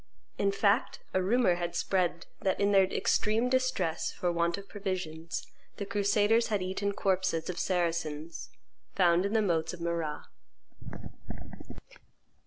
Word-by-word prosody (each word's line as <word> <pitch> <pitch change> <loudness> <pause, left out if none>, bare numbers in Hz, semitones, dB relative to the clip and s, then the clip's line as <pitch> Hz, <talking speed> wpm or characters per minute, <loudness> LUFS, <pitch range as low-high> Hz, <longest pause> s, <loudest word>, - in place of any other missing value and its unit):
In 200 0 +2
fact 200 +4 +1
a 185 - +2
rumor 225 +1 +3
had 175 0 -3
spread 180 -3 0 0.2
that, 190 -1 0
in 200 0 +3
their 195 -1 +6
extreme 215 +5 +1
distress 255 -11 0
for 175 - -1
want 170 +1 0
of 200 0 -9
provisions, 180 -6 -4 0.3
the 200 - -3
crusaders 205 +2 +2
had 205 -4 0
eaten 195 +2 -1
corpses 185 -4 0
of 180 - -7
Saracens 165 -3 -2 0.5
found 180 +1 +4
in 200 - -4
the 220 -1 +3
moats 165 -4 0
of - - -16
Marrah. 170 -3 -3
185 Hz, 135 wpm, -30 LUFS, 170-205 Hz, 0.5 s, their